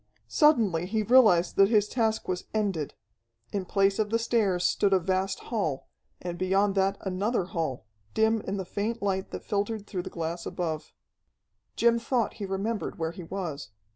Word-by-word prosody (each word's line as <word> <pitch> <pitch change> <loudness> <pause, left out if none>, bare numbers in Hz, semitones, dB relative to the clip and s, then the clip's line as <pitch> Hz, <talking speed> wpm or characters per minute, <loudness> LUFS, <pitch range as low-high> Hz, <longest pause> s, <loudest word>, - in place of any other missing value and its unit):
Suddenly 210 - +3
he 215 +2 0
realized 210 -7 +5
that 195 0 +6
his 210 -2 +3
task 220 -1 0
was 180 -1 -2
ended. 195 -9 -1 0.6
In 195 -2 -1
place 195 +2 +2
of 215 -1 +1
the 230 - +2
stairs 215 -6 +1
stood 200 +1 +2
a 190 - +5
vast 190 +2 -1
hall, 160 - -1 0.3
and 175 -1 -5
beyond 195 +2 +2
that 195 0 +1
another 195 +3 0
hall, 160 - -3 0.3
dim 220 0 +3
in 195 - -2
the 190 - -3
faint 210 +5 -3
light 190 -1 -1
that - - -7
filtered 205 +1 -2
through 185 -3 -3
the - - -7
glass 170 0 -4
above. 160 -4 -3 0.8
Jim 235 0 +3
thought 235 -1 0
he 200 - -2
remembered 200 +3 -2
where 160 0 -2
he 175 - -9
was. 165 - -5
195 Hz, 170 wpm, -28 LUFS, 180-220 Hz, 0.8 s, that